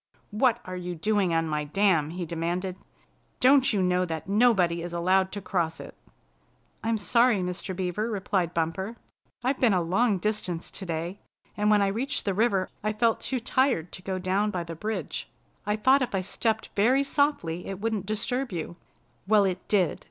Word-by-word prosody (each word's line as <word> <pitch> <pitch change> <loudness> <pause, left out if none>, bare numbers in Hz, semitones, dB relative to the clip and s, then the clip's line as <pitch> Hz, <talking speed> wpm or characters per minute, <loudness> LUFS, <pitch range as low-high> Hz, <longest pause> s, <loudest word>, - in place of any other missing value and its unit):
"What 230 +3 +2
are 185 - -6
you 180 -1 -5
doing 200 +1 +1
on 165 0 +1
my 150 -1 -1
dam?" 165 -1 +2
he 175 +1 -4
demanded. 175 +3 -3 0.6
"Don't 265 +1 +5
you 200 -4 +1
know 180 0 +2
that 160 -2 -4
nobody 195 -6 +3
is 175 0 -6
allowed 185 +2 +2
to 205 - -4
cross 170 -4 -1
it?" - - -9 0.9
"I'm 225 0 +1
sorry, 235 0 +3
Mr. 180 +1 -4
Beaver," 190 +4 -2
replied 190 -4 -1
Bumper. 175 +6 -2 0.5
"I've 260 +2 0
been 230 -6 +4
a 180 - +2
long 200 +5 +2
distance 185 -4 -3
today, 175 0 -4 0.4
and 210 0 +1
when 210 -1 +5
I - - +2
reached 255 +7 -2
the 200 - +1
river 195 -2 +2 0.2
I 215 0 0
felt 225 +1 +2
too 260 - -2
tired 240 - +1
to 185 - -8
go 190 0 -3
down 190 +3 0
by 180 -4 -2
the 170 0 -7
bridge. 215 +7 -4 0.4
I 210 - +2
thought 260 +6 +4
if 245 -5 -1
I 190 - +1
stepped 220 +3 -1
very 250 +7 +4
softly 275 - 0
it 195 -1 -5
wouldn't 215 -3 -2
disturb 245 +4 -1
you." 170 0 -5 0.5
"Well, 210 -1 +5
it 185 -2 -3
did! 190 -6 +2
195 Hz, 180 wpm, -27 LUFS, 175-220 Hz, 0.9 s, Don't